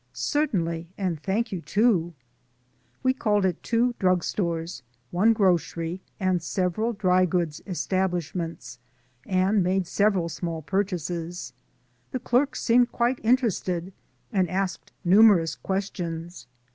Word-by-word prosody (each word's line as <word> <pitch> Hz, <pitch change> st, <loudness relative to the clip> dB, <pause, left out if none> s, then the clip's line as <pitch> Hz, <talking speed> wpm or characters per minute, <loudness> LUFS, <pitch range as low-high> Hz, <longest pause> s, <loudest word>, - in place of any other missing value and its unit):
"Certainly, 170 Hz, -, -1 dB
and 180 Hz, -6 st, -2 dB
thank 220 Hz, +6 st, -1 dB
you 185 Hz, -4 st, -3 dB
to." 180 Hz, -5 st, +1 dB, 0.9 s
We 260 Hz, 0 st, +3 dB
called 210 Hz, -6 st, +1 dB
at 180 Hz, -3 st, -1 dB
two 240 Hz, +1 st, +1 dB
drug 185 Hz, -2 st, +2 dB
stores, 170 Hz, -7 st, -2 dB, 0.3 s
one 200 Hz, +6 st, +4 dB
grocery 180 Hz, -3 st, +1 dB, 0.2 s
and 185 Hz, -3 st, +1 dB
several 185 Hz, +6 st, -1 dB
dry 185 Hz, -4 st, +2 dB
goods 170 Hz, -4 st, -1 dB
establishments, 175 Hz, -7 st, -2 dB, 0.5 s
and 190 Hz, +2 st, +2 dB
made 185 Hz, +1 st, +1 dB
several 195 Hz, -1 st, +1 dB
small 165 Hz, -1 st, -4 dB
purchases. 175 Hz, -, -3 dB, 0.6 s
The 255 Hz, -, -1 dB
clerks 250 Hz, +4 st, +1 dB
seemed 245 Hz, +1 st, +4 dB
quite 240 Hz, +2 st, +1 dB
interested, 195 Hz, -7 st, +1 dB, 0.4 s
and 185 Hz, -4 st, +2 dB
asked 190 Hz, 0 st, -3 dB
numerous 190 Hz, -3 st, +6 dB
questions. 175 Hz, -6 st, -4 dB
185 Hz, 115 wpm, -26 LUFS, 170-210 Hz, 0.9 s, numerous